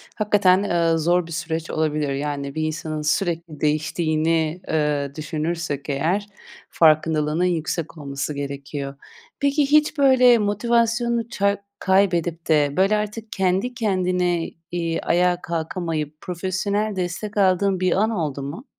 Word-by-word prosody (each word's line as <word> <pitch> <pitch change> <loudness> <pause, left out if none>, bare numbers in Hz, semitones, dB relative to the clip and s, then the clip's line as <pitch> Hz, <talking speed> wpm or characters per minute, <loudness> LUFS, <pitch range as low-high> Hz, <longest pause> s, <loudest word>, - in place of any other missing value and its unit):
hakikaten, 200 -3 +3
ııı, 170 -4 +1
zor 175 +2 +2
bir - - -10
süreç 160 0 -3
olabilir. 150 -2 0
Yani 140 0 -3
bir 155 - -1
insanın 155 0 -3
sürekli 165 0 -1
değiştiğini, 155 +2 0
eee, 150 -3 0
düşünürsek 155 -2 -3
eğer 170 +9 0 0.4
farkındalığının 155 0 +3
yüksek 165 -1 -2
olması 140 0 -4
gerekiyor. 140 0 -5 0.4
Peki, 280 +1 +2
hiç 305 +1 +4
böyle 255 -3 +6
motivasyonunu 235 +2 +1
ça 200 -3 0 0.2
kaybedip 175 -4 +1
de 150 -3 +3
böyle 195 +3 +4
artık 210 +1 -5
kendi 190 +6 0
kendine, 180 -6 0 0.2
iii, 170 -1 -2
ayağa 180 +1 +2
kalkamayıp 160 -2 -3
profesyonel 195 +4 -2
destek 185 +4 -4
aldığın 190 0 +3
bir 185 -1 +1
an 215 +5 +2
oldu 155 -10 -2
mu? 155 - -7
170 Hz, 125 wpm, -22 LUFS, 155-200 Hz, 0.4 s, böyle